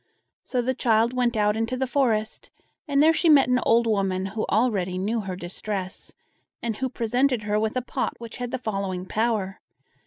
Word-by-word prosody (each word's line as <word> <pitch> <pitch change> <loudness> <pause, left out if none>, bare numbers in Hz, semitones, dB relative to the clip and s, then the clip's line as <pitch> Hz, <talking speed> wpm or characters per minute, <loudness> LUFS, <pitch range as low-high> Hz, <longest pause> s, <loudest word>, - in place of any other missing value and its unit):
So 250 -2 -1
the 260 +2 0
child 230 -1 +2
went 245 -2 +1
out 210 0 +2
into 225 +3 -1
the 265 - 0
forest, 235 -5 0 0.4
and 285 0 +3
there 320 +1 +6
she 335 +1 +2
met 285 -4 +6
an 250 0 +3
old 235 +1 +4
woman, 195 -4 0
who 210 +3 -3
already 200 -5 +1
knew 215 +5 -1
her 190 -2 -5
distress, 190 +1 -6 0.5
and 230 -2 -3
who 260 0 -2
presented 245 +1 0
her 210 0 0
with 220 +3 -1
a 250 - -1
pot - - -3
which 230 -1 -9
had 245 -1 -4
the - - -2
following 195 -6 -3
power. 215 -2 -1
225 Hz, 190 wpm, -25 LUFS, 200-250 Hz, 0.5 s, there